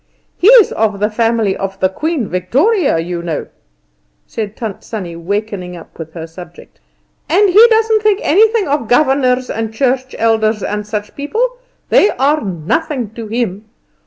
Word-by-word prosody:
He's 450 +3 +6
of 215 -2 -1
the 210 +2 0
family 225 -3 +1
of 195 0 -5
the 190 - +3
Queen 300 - -2
Victoria, 275 - +1
you 170 +1 -3
know," 165 -3 -3 0.8
said 215 -2 -5
Tant 220 -5 -6
Sannie, 185 -7 -6
wakening 185 0 -4
up 170 - -15
with 160 0 -8
her 165 -1 -6
subject; 180 - -13 0.5
"and 410 0 +4
he 435 +6 +8
doesn't 445 -1 +2
think 420 -1 +2
anything 435 +4 +3
of 280 -5 -1
governors 255 -1 +2
and 225 0 -3
church 260 +2 -1
elders 220 -2 +1
and 210 0 -3
such 210 -1 -5
people; 435 +13 -1 0.4
they 410 - +5
are 290 +3 +1
nothing 220 - -2
to 225 0 -8
him. 215 -2 -3
225 Hz, 155 wpm, -15 LUFS, 195-300 Hz, 0.8 s, he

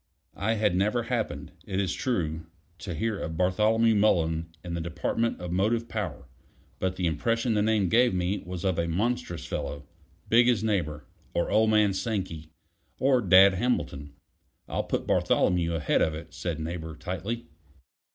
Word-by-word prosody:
I 110 +3 +1
had 105 -4 +1
never 105 +6 +1
happened, 120 -2 -3
it 95 0 -3
is 95 -2 0
true, 80 -10 -2 0.3
to 90 -3 -5
hear 110 +4 -1
of 80 0 -4
Bartholomew 110 +5 +3
Mullen 85 -6 +2 0.2
in 85 - -4
the 85 - -2
department 85 +8 -1
of 90 -1 -5
motive 110 +6 +1
power; 90 - -4 0.5
but 95 0 -1
the 90 - -1
impression 115 - 0
the 105 - +2
name 105 -2 +2
gave 120 +7 +4
me 90 +2 -1
was 90 +1 -6
of 95 -3 +1
a 85 - 0
monstrous 105 +1 -2
fellow, 70 0 -4 0.4
big 120 +2 +5
as 115 -4 +2
Neighbor, 85 -9 -1 0.3
or 85 - 0
old 110 +1 +4
man 105 -2 +4
Sankey, 95 -6 -3 0.5
or 130 -2 +3
Dad 95 -1 +7
Hamilton. 75 - -2 0.5
"I'll - - -2
put - - -2
Bartholomew 85 -2 +2
ahead 80 -2 +1
of 80 - +1
it," 80 - -9
said 85 -3 -4
Neighbor 80 0 -5
tightly. 95 +8 -4
95 Hz, 160 wpm, -27 LUFS, 85-110 Hz, 0.5 s, Dad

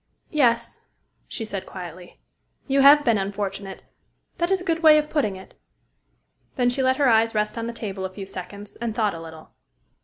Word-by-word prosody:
"Yes," 245 -7 +1 0.5
she 225 - -5
said 200 -3 -6
quietly: 175 -1 -10 0.5
"you 275 0 +2
have 290 +2 +7
been 230 -4 +3
unfortunate. 195 0 -5 0.6
That 345 0 +1
is 385 -1 +2
a - - -7
good 330 -2 0
way 310 -2 +7
of 300 0 -1
putting 215 -11 0
it." 190 - -13 1.0
Then 245 -1 +2
she 265 - -1
let 260 0 +2
her 285 - +3
eyes 225 -1 +3
rest 210 0 0
on 230 -1 -4
the - - -3
table 200 -5 -6
a 190 - -3
few 195 +1 -8
seconds, 200 +2 -8
and 230 -2 -4
thought 215 -4 +1
a 165 - -8
little. 160 -1 -12
220 Hz, 190 wpm, -24 LUFS, 195-270 Hz, 1.0 s, have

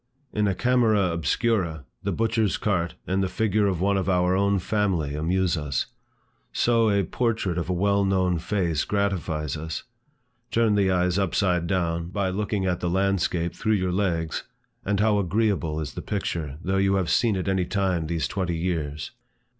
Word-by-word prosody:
In 105 -1 +1
a 95 - 0
camera 110 -6 +3
obscura, 85 - 0 0.2
the - - -2
butcher's 110 -2 +1
cart, 90 -5 -1
and 95 +1 0
the 95 - +1
figure 105 +1 +1
of 95 -4 0
one 100 +1 +2
of 95 0 -1
our 90 0 +2
own 100 +1 +2
family 95 -7 0
amuse 90 +4 +1
us. 75 -5 -1 0.7
So 115 -2 +3
a 100 -1 +2
portrait 110 -4 -1
of 85 - -4
a - - +1
well 100 +2 +2
known 95 -3 +1
face 85 -4 0
gratifies 90 -8 -1
us. 80 0 -5 0.7
Turn 115 -2 +2
the 100 -2 +3
eyes 90 0 +2
upside 90 -2 +1
down, 85 -2 -1
by 95 0 -1
looking 100 0 -1
at 90 -1 0
the 90 - -1
landscape 90 -2 0
through 110 -1 0
your 95 -3 +1
legs, 85 -4 -1 0.4
and 100 0 0
how 105 -1 +3
agreeable 95 -5 0
is 75 - -4
the - - -5
picture, 85 -8 -3
though 95 +1 0
you 95 0 +3
have 95 -4 0
seen 115 -4 +3
it 95 +1 -3
any 95 -2 +1
time 95 -4 0
these 80 -4 -1
twenty 90 -4 -2
years! 80 -4 -3
95 Hz, 175 wpm, -25 LUFS, 85-100 Hz, 0.7 s, camera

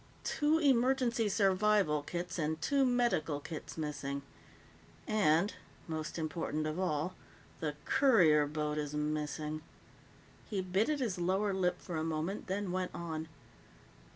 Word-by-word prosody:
Two 305 +1 +2
emergency 255 -5 +3
survival 195 -5 +3
kits 175 +4 -4
and 155 0 -1
two 275 - +2
medical 235 -12 +1
kits 155 +2 -7
missing. 145 -2 -3 0.8
And 200 -3 +3 0.3
most 160 -1 -4
important 155 -1 -2
of 155 +3 -2
all 180 -1 0 0.5
the 150 -2 -2
courier 180 - +5
boat 150 0 -2
is 150 0 -3
missing." 150 +1 -2 0.9
He 205 - -1
bit 190 +5 +1
at 300 -2 0
his 205 -7 -1
lower 190 +3 +1
lip 180 -1 +1
for 175 -3 -5
a 155 - -1
moment, 165 +5 -2
then 195 0 -2
went 185 0 -2
on. 160 -2 -4
175 Hz, 130 wpm, -33 LUFS, 155-210 Hz, 0.9 s, courier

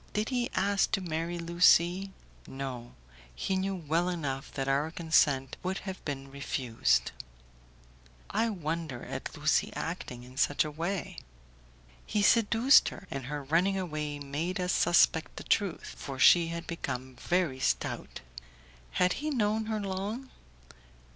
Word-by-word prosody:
Did 210 +1 -1
he 245 -2 0
ask 200 +1 +2
to - - +3
marry 170 -1 -3
Lucie?" 175 +2 +4 0.4
"No; 130 -3 -6 0.4
he 190 - -1
knew 190 +1 -1
well 170 +1 0
enough 145 -6 -3
that 135 -1 -3
our 140 +3 +1
consent 155 -5 +2
would 185 +1 -2
have 190 -1 -6
been 135 -2 -5
refused!" 120 - 0 1.2
"I 225 +3 +1
wonder 160 - -4
at - - -6
Lucie - - +2
acting 120 -1 -5
in 125 +1 -14
such 145 +1 +2
a 155 - -4
way." 170 +4 -3 0.8
"He 210 - 0
seduced 230 +5 +5
her, - - -11
and 135 -2 -4
her 145 0 -4
running 175 +7 +2
away 150 -5 -3
made 145 +6 -3
us 180 0 0
suspect 160 -1 +3
the - - -7
truth, 200 -6 0
for 135 -2 -6
she 170 +5 +6
had 170 0 -5
become 130 -6 -5
very 175 -7 0
stout." - - -2 0.7
"Had 180 0 +3
he 305 - -1
known 220 -5 0
her 220 -1 -1
long?" 205 +6 -4
170 Hz, 140 wpm, -30 LUFS, 140-195 Hz, 1.2 s, she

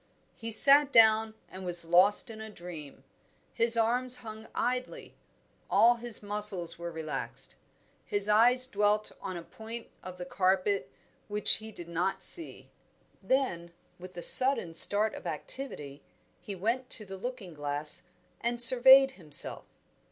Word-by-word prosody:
He 230 - -10
sat 280 +5 +4
down 220 -2 +3
and 190 0 -12
was 175 -2 -2
lost 190 +8 +3
in 220 0 -12
a 220 - -10
dream. 175 -7 -12 0.5
His 230 0 +6
arms 250 +2 -2
hung 220 0 -11
idly; 250 +1 -5 0.6
all 240 +1 +3
his 235 -3 -8
muscles 205 -5 +1
were 170 0 -7
relaxed. 160 -2 -7 0.5
His 205 0 -1
eyes 240 +4 +3
dwelt 210 -3 -1
on 185 -2 -7
a 170 - -10
point 225 +5 -11
of 185 0 -11
the 180 - -9
carpet 185 -4 -2 0.4
which 210 0 +2
he 220 +1 -12
did 175 -5 -11
not 170 +3 -4
see. 335 -2 -5 0.5
Then, 180 -11 -3 0.3
with 180 0 -14
a 175 - -8
sudden 255 -10 +5
start 210 +6 +4
of - - -10
activity, 150 - -6 0.4
he 200 - -9
went 235 +7 -4
to 215 - -1
the 195 0 -10
looking 205 -3 -9
glass 145 +3 -4 0.3
and 240 0 -2
surveyed 265 +2 +7
himself. 155 - -2
210 Hz, 145 wpm, -27 LUFS, 175-235 Hz, 0.6 s, surveyed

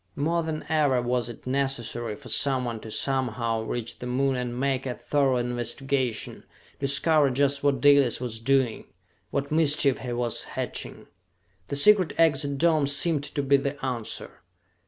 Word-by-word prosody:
More 165 +4 0
than 160 -1 -4
ever 145 -5 +2
was 120 -1 -1
it 120 - -11
necessary 120 -4 -2
for - - -14
someone 125 -4 0
to 110 - -10
somehow 115 -2 -1
reach 115 +1 -5
the 125 - -6
Moon 135 +2 0
and 125 -1 -4
make 135 -1 -1
a 125 - -3
thorough 140 -3 +1
investigation, 125 +1 -2 0.4
discover 140 +1 +2
just 140 +2 0
what 140 -3 +1
Dalis 140 -3 +4
was 120 -3 -5
doing, 130 -1 +1 0.4
what 140 +1 -3
mischief 150 -3 +3
he 125 - -5
was 120 -1 -1
hatching. - - -5 0.6
The 140 - -3
secret 190 +4 +5
exit 145 -3 +2
dome 155 -2 +2
seemed 145 +1 +2
to 145 0 -3
be 140 +1 +4
the 140 +1 -3
answer. 120 -4 -5
135 Hz, 155 wpm, -26 LUFS, 120-145 Hz, 0.6 s, secret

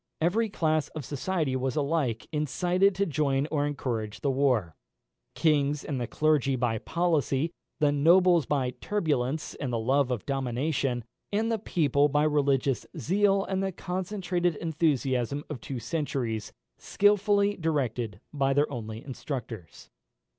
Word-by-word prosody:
Every 215 +8 +1
class 155 -5 +1
of 150 -4 -5
society 150 0 -1
was 130 -1 -1
alike 140 -6 0
incited 180 +6 +1
to 200 +2 +1
join 140 -3 +1
or 145 -2 +1
encourage 115 -7 -3
the 140 - +1
war: 125 - +1 0.6
kings 150 -2 +2
and 135 -4 -3
the 120 - -2
clergy 150 -2 +2
by 120 -3 0
policy, 160 -2 0 0.3
the 150 -2 +3
nobles 170 +3 +4
by 135 -4 0
turbulence 155 -8 -1
and 130 -4 -4
the 120 - 0
love 130 +4 +2
of 125 -5 -3
dominion, 135 -1 -1 0.3
and 220 +3 0
the 225 - 0
people 145 - +2
by 145 +1 +2
religious 140 -3 +2
zeal 195 - +2
and 190 0 -1
the 195 0 -1
concentrated 180 -1 -2
enthusiasm 145 -5 0
of 130 -6 -5
two 135 - -5
centuries, 120 -4 -3 0.3
skilfully 205 0 +3
directed 125 - -2
by 135 -2 +1
their 145 +1 +2
only 110 -3 -6
instructors. 120 - -7
145 Hz, 140 wpm, -28 LUFS, 130-170 Hz, 0.6 s, nobles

